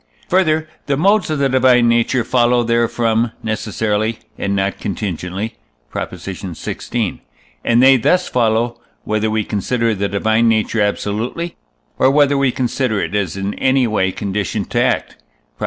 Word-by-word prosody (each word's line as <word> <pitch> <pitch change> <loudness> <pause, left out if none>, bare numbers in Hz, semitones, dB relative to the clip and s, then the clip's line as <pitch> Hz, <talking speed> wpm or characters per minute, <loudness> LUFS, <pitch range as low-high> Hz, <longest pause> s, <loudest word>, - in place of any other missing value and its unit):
Further, 160 -4 +2 0.2
the 140 -1 +1
modes 200 +4 +3
of 155 - 0
the 140 -1 +2
divine 130 -2 +4
nature 115 +1 +2
follow 120 0 +2
therefrom 115 0 +1
necessarily, 110 0 -1 0.2
and 100 0 -2
not 95 0 -1
contingently 95 +1 -4 0.3
(Prop. - - -3
xvi.); 95 +4 -4 0.4
and 120 +1 +3
they 135 0 +7
thus 180 +10 +2
follow, 115 0 +1 0.2
whether 110 0 0
we 110 0 0
consider 115 +3 0
the 100 0 -2
divine 110 +3 +2
nature 110 0 +1
absolutely, 110 +11 -2 0.4
or 130 - +5
whether 145 0 +4
we 140 -2 +2
consider 125 -3 -1
it - - -3
as 100 -4 -1
in 100 +1 -2
any 130 -1 +3
way 100 -4 +1
conditioned 100 0 -3
to - - +2
act - - 0 0.3
(Prop. - - -42
115 Hz, 150 wpm, -18 LUFS, 105-130 Hz, 0.4 s, they